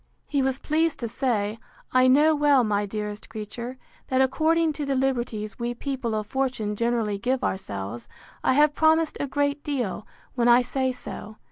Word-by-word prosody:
—He 285 -2 0
was 265 0 0
pleased 315 +1 0
to 235 - -1
say, 220 -3 -1 0.3
I 255 0 +5
know 295 +5 +5
well, 290 -3 +4
my 205 -2 0
dearest 210 0 -5
creature, 230 +3 -6 0.3
that, 260 - +1
according 315 +5 +2
to 295 - -4
the 275 - +1
liberties 240 -5 -1
we 240 0 -2
people 260 -4 -3
of 215 -1 -2
fortune 250 -4 -1
generally 230 -3 0
give 250 +4 0
ourselves, 105 - -4 0.4
I - - +3
have 295 +2 +4
promised 320 +1 +3
a 285 - -1
great 285 +1 0
deal, 245 -8 -3 0.3
when 240 -2 +1
I 240 +1 +6
say 260 +1 -1
so. 220 -3 -8
255 Hz, 170 wpm, -25 LUFS, 215-280 Hz, 0.4 s, I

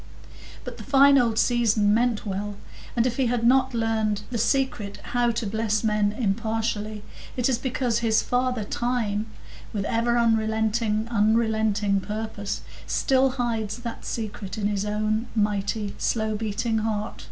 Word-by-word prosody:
But - - -7
the - - -7
fine 275 0 +6
old 230 -3 +1
season 220 -4 +3
meant 235 -1 +1
well; 205 +1 -3 0.4
and 235 -1 +2
if 240 -2 -1
he 265 -2 +2
has 235 -1 0
not 260 +1 +3
learned 220 -2 0
the 235 - -1
secret 235 -4 0
how 245 -1 +1
to 230 0 -2
bless 215 +1 0
men 210 -2 +2
impartially, 215 -1 -2 0.3
it 245 - +2
is 255 -3 +1
because 250 -3 0
his 225 -1 +2
father 250 -2 0
Time, 220 -2 -1 0.4
with 205 -2 -2
ever 235 +1 +1
unrelenting 220 -2 +1
purpose, 210 0 -4 0.3
still 265 -1 +3
hides 225 -4 -2
that 240 -1 -7
secret 215 -3 -5
in 210 - -2
his 205 -1 0
own 215 +2 0
mighty, 205 0 0
slow 220 -1 0
beating 220 +1 -1
heart. 215 -1 -3
220 Hz, 140 wpm, -25 LUFS, 210-235 Hz, 0.4 s, fine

